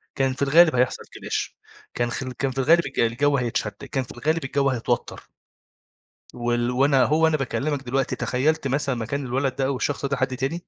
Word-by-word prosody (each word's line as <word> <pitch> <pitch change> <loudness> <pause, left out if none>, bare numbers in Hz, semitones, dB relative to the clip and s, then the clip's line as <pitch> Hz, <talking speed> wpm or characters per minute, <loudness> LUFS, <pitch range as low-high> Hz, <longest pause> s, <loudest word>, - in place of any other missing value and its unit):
كان 135 -1 +1
في 130 - -9
الغالب 155 +2 +5
هيحصل 125 0 +1
clash. - - -4 0.4
كان 120 0 -1
خل 130 +2 -4
كان 135 +2 -2
في 135 - -11
الغالب 165 +5 +4
الج 140 - -5
الجَو 140 +5 +2
هيتشد، 115 -3 -1 0.2
كان 135 -3 0
في - - -11
الغالب 155 +6 -1
الجَو 140 0 +1
هيتوتَّر. 120 -1 -2 1.1
وال 120 0 -1
وأنا 135 +1 +3
أهو 155 +2 +2
وأنا 160 -1 +4
باكلّمك 140 +1 -2
دلوقتي، 135 +1 -1
تخيّلت 140 +3 0
مثلًا 135 -1 0
مكان 130 +5 -3
الولد 130 +2 -1
ده 135 -1 0
أو 140 - 0
الشخص 140 +2 -2
ده 140 -1 -1
حد 130 0 -1
تاني. 135 +5 -2
135 Hz, 190 wpm, -24 LUFS, 125-145 Hz, 1.1 s, الغالب